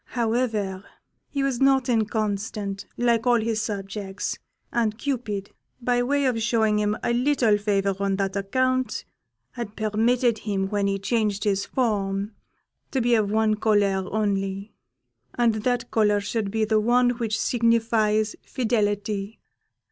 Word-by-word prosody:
However, 220 -5 0 0.5
he 280 -1 -1
was 270 -3 -1
not 270 -2 +4
inconstant, 210 -3 -1
like 235 0 +2
all 240 -1 +5
his 220 -1 -1
subjects, 200 -2 -4 0.3
and 220 -3 0
Cupid, 225 -8 -3 0.3
by 245 0 +1
way 280 +3 +1
of 240 -3 +1
showing 220 -2 +2
him 210 0 0
a 235 - +1
little 245 -3 +3
favour 200 -1 +1
on 200 -1 +1
that 195 0 -2
account, 255 +4 0 0.5
had 235 -4 -6
permitted 225 +2 +1
him, 195 -2 -2
when 205 -1 0
he 195 0 0
changed 205 0 0
his 200 -1 0
form, 205 -4 -1 0.6
to 265 - -1
be 240 0 +2
of 215 -3 +3
one 215 0 +2
colour 200 -3 +2
only, 200 -1 -1 0.6
and 235 -2 +3
that 240 +2 -1
colour 210 -2 +3
should 205 0 -2
be 220 +1 0
the 215 0 +2
one 245 +3 +3
which 230 -3 -2
signifies 225 -2 +2
Fidelity. 210 -3 -1
220 Hz, 140 wpm, -25 LUFS, 205-235 Hz, 0.6 s, all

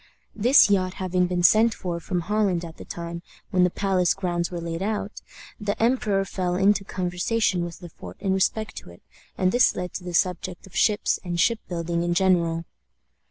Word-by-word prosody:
This 240 +6 +6
yacht 185 -2 +1
having 185 -1 0
been 180 -1 -1
sent 220 +5 +5
for 175 -3 -4
from 175 +2 -2
Holland 190 -2 0
at 165 -1 -11
the - - -10
time 170 0 -6 0.3
when 180 -1 +3
the 180 - +4
palace 185 -2 +1
grounds 175 -3 -2
were 175 - -5
laid 165 0 -4
out, 210 0 -3 0.4
the 205 -1 -3
emperor 225 -5 +1
fell 180 -2 -2
into 195 +1 +3
conversation 185 +1 -1
with 175 +1 -8
Le 175 - -8
Fort 90 - -11
in 190 - 0
respect 215 +3 0
to - - -9
it, 85 - -16 0.3
and 185 0 +2
this 245 +2 +4
led 180 0 -5
to 185 - -6
the 180 -1 -5
subject 180 0 -1
of 190 - -16
ships 210 -2 +2
and 175 -2 -3
ship 230 +4 +3
building 170 -1 -2
in 175 0 0
general. 170 -3 +2
180 Hz, 195 wpm, -24 LUFS, 175-200 Hz, 0.4 s, This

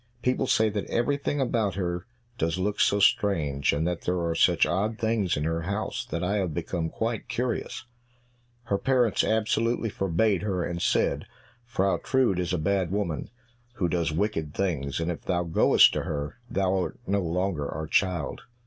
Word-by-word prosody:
People 130 +1 +1
say 110 -2 +3
that 105 -1 -2
everything 140 +4 0
about 115 -7 0
her 90 -1 -3 0.3
does 80 +2 0
look 100 +2 -1
so 100 - +3
strange, 80 -9 +2
and 75 +3 0
that 90 -1 -2
there 90 0 -1
are 85 -1 0
such - - +4
odd 105 +5 -1
things 110 -7 0
in 75 - -1
her 80 +1 -1
house, 100 +5 -3
that 85 +2 -2
I 100 +4 +1
have 90 -6 -1
become 85 -1 -2
quite 115 +3 -3
curious!" 125 0 -2 0.8
Her 100 -4 -1
parents 125 -5 +2
absolutely 110 +1 +1
forbade 95 0 +1
her, 95 -3 -1
and 85 0 -3
said, 75 +8 +1 0.4
"Frau 100 -5 +1
Trude 125 -9 +2
is 90 0 -1
a 90 - +1
bad 95 +2 0
woman, 95 -5 -2 0.5
who 90 - 0
does 85 -1 0
wicked 80 -4 -2
things, 75 -8 -1
and 85 +1 -1
if 85 - -6
thou 90 -2 0
goest 85 -1 +5
to - - -1
her; 75 +7 -4
thou 95 -1 +1
art 90 - -4
no 100 -1 +1
longer 85 -3 -1
our 80 +1 -4
child." 85 -2 0
95 Hz, 175 wpm, -27 LUFS, 85-105 Hz, 0.8 s, goest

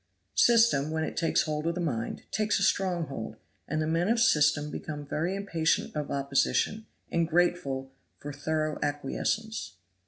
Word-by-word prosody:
System, 225 -12 +5
when 160 0 -1
it - - -4
takes 165 - +2
a - - -6
hold 155 0 -2
of 170 - 0
the - - -3
mind, 125 -10 -2
takes 215 0 +1
a - - 0
strong 180 -4 +1
hold, 115 -6 -6 0.3
and 155 - -1
the 155 - 0
men 165 +4 +1
of 230 +1 +3
system 150 -8 +3
became 150 -2 -6
very 165 +6 -1
impatient 170 -7 0
of 150 -1 -3
opposition, 140 +10 0 0.2
and 170 -1 +1
grateful 155 -6 0 0.3
for 145 0 -7
thorough 155 +1 -2
acquiescence. 145 - -2
155 Hz, 165 wpm, -29 LUFS, 145-175 Hz, 0.3 s, System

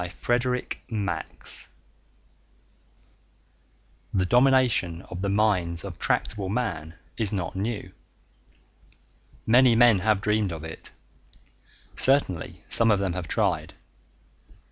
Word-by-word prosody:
pgdp.net 120 +1 -3 2.5
_The 95 -1 +1
domination 125 -8 +3
of 90 0 -5
the 100 - -1
minds 95 -5 +1
of 95 -5 -8
tractable 100 -3 0
Man 85 -9 -3 0.2
is 110 -4 +1
not 95 -4 -3
new. 105 +3 -4 1.5
Many 120 +1 +5
men 115 -4 +6
have 110 +1 +2
dreamed 105 -1 0
of 80 -2 -6
it. 80 0 -8 1.0
Certainly 130 - +1
some 115 -1 +3
of 105 - +4
them 95 -2 -1
have 90 -2 -5
tried. - - -1
100 Hz, 100 wpm, -25 LUFS, 90-120 Hz, 2.5 s, men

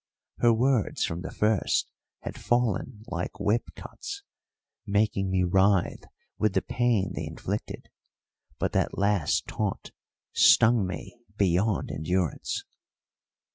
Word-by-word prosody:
Her 120 - +5
words 120 -1 +2
from 80 +1 -4
the - - -5
first 105 -1 +1 0.3
had - - -6
fallen 120 -1 0
like 90 -1 -5
whip 105 +4 +1
cuts, 400 0 -8 0.6
making 100 -2 +1
me 95 -1 +2
writhe 95 +1 +2 0.3
with 110 -2 +2
the - - +2
pain 115 -6 +1
they 80 - -4
inflicted; 95 +6 -5 0.7
but - - -1
that - - 0
last 100 -5 +1
taunt - - -3 0.4
stung 115 -4 +5
me 95 +6 -7 0.2
beyond 95 +1 +1
endurance. 90 0 -1
100 Hz, 115 wpm, -27 LUFS, 90-115 Hz, 0.7 s, Her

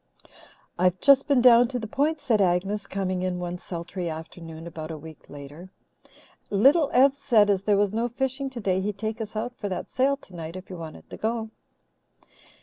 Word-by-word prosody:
"I've 180 0 +2
just 275 0 +5
been 280 -4 +4
down 240 -1 +7
to 250 0 -3
the 225 - -4
Point," 295 +8 0
said 235 -7 +2
Agnes, 195 +3 0
coming 185 -2 -2
in 185 -1 -1
one 175 0 -4
sultry 175 0 -5
afternoon 160 0 -8
about 160 -2 -7
a 160 - -5
week 160 0 -13
later, 145 +5 -10 0.8
"and 200 +1 0
Little 290 +1 +6
Ev 270 +2 +5
said 235 -8 +3
as 195 -2 +1
there 205 0 +2
was 205 0 +1
no 230 +2 0
fishing 265 +3 -2
today 195 -7 -1
he'd 205 +1 -3
take 220 +2 -4
us 220 0 -6
out 240 +3 -3
for 205 - -4
that 185 - -5
sail 270 +2 +2
tonight 170 - -9
if 185 +1 -9
you - - -6
wanted 165 -2 -9
to - - -7
go." 220 0 -2
205 Hz, 195 wpm, -26 LUFS, 180-245 Hz, 0.8 s, down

